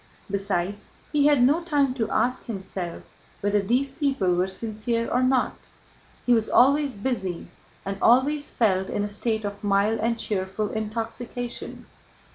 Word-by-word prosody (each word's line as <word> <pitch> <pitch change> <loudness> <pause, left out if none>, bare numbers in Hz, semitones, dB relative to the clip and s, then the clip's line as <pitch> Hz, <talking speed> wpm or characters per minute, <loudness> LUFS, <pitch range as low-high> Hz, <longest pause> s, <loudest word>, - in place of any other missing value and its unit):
Besides, 200 0 -2 0.2
he 295 -1 +4
had 290 -4 +5
no 295 +7 +4
time 290 -6 +1
to 235 -4 -2
ask 250 +1 0
himself 190 -5 -5 0.4
whether 205 0 +2
these 250 +7 +1
people 270 - +1
were 180 +1 +1
sincere 225 +4 -2
or 250 - +1
not. 255 0 +2 0.7
He 245 - +4
was 225 -2 +2
always 280 +1 +4
busy 195 -7 -3 0.4
and 195 0 -4
always 285 +5 +3
felt 190 -4 +1
in 205 - -1
a - - -1
state 220 +1 -1
of 200 0 -6
mild 205 +2 +2
and 230 +1 0
cheerful 200 -1 -2
intoxication. 230 +2 -4
225 Hz, 145 wpm, -25 LUFS, 200-255 Hz, 0.7 s, had